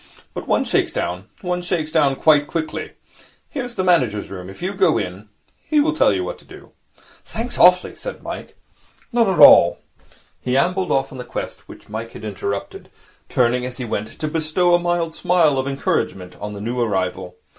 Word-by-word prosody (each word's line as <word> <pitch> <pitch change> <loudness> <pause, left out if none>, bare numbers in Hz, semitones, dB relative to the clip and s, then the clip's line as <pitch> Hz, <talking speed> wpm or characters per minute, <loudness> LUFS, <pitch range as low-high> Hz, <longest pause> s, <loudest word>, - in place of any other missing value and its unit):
But - - -6
one - - +2
shakes - - +1
down. 90 +2 -3 0.2
One 180 0 -2
shakes 170 -3 -2
down 145 -4 +3
quite 145 0 +4
quickly. 160 -2 -4 0.6
Here 275 - -3
is 245 -1 -7
the 185 - -1
manager's 125 - +1
room. 90 -1 -7
If 95 - -12
you 190 +2 -2
go 190 -5 +3
in, 95 +2 -5 0.3
he 305 - +1
will 315 +2 +2
tell 320 - +4
you 365 - -1
what - - -5
to - - -19
do.' - - -14 0.5
'Thanks 240 +2 -5
awfully,' 180 0 +5
said - - -7
Mike. - - -7 0.6
'Not 235 -2 +3
at 190 - 0
all.' - - +8 0.6
He 125 +1 0
ambled 180 +6 +1
off 135 0 +1
on 130 - -9
the - - -4
quest - - -6
which - - -13
Mike 110 +2 -6
had - - -9
interrupted, 100 -1 -5 0.4
turning, 125 0 +2
as 125 0 -4
he 125 - -4
went, 110 -1 -3
to 155 - -2
bestow 160 +3 +1
a 175 - +5
mild 175 -2 -1
smile 160 -7 +2
of 130 - -2
encouragement 95 -9 -2
on 105 0 -5
the 100 - -7
new 120 +4 -3
arrival. 95 -5 -2
145 Hz, 195 wpm, -21 LUFS, 110-180 Hz, 0.6 s, all